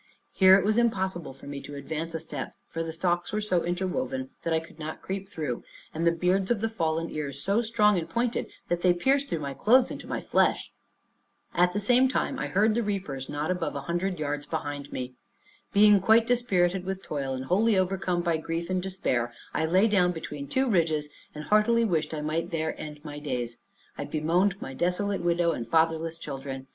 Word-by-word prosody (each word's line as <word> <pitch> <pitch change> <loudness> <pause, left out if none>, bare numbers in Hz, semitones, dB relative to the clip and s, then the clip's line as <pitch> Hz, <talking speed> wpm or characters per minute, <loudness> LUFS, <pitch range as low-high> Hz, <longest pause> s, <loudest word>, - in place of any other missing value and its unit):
Here 190 0 +7
it 195 - 0
was 215 +2 +3
impossible 190 - 0
for 135 - -14
me 140 -1 -6
to 145 - -9
advance 160 +4 -4
a - - -1
step; 145 -3 -6
for 165 - -4
the 165 0 -3
stalks 175 +2 0
were 215 - 0
so 185 -5 +1
interwoven, 255 +10 -2
that 165 - -2
I 160 - +3
could 160 0 -14
not 155 0 -6
creep 195 0 -4
through, 150 -10 -4 0.3
and 165 +2 0
the - - +6
beards 180 +3 +1
of 240 -3 +2
the 225 +2 0
fallen 165 -5 -1
ears 140 -2 -4
so 200 +4 +2
strong 210 -4 +3
and 160 - -6
pointed, 235 0 -1 0.2
that 175 0 -1
they 180 -1 +4
pierced 275 +9 +2
through 165 - -2
my 140 -1 -3
clothes 250 - +4
into - - -7
my - - -2
flesh. - - +1 0.8
At 180 +1 +3
the 205 - 0
same 245 +5 +4
time 270 +1 -1
I - - -2
heard 210 +3 +3
the 235 - +1
reapers 185 - -3
not 150 +3 -2
above 185 - -2
a 140 - -3
hundred 175 +4 -2
yards 145 -1 -3
behind 145 -3 -4
me. 125 0 -5 0.6
Being 205 0 +6
quite 220 +4 +5
dispirited 195 -7 +1
with 190 0 -4
toil, 135 -3 -3
and 130 0 -5
wholly 205 +7 +3
overcome 185 -1 0
by 170 -2 +1
grief 165 +2 -4
and 185 0 +1
despair, 180 -11 -1 0.2
I - - +1
lay 185 +6 +4
down 180 -4 +3
between 150 -3 -6
two 265 - +1
ridges, 160 -8 +1 0.3
and 150 - -6
heartily 220 +5 +3
wished 165 -7 0
I 150 - -3
might 160 +3 -2
there 160 -2 -1
end 150 0 -8
my 145 -1 -6
days. 125 -5 -3 0.4
I - - -2
bemoaned 175 +6 +1
my 135 - -6
desolate 180 +6 0
widow 170 0 +2
and 115 - -4
fatherless 165 0 +1
children. 135 -3 -6
175 Hz, 205 wpm, -27 LUFS, 155-200 Hz, 0.8 s, Here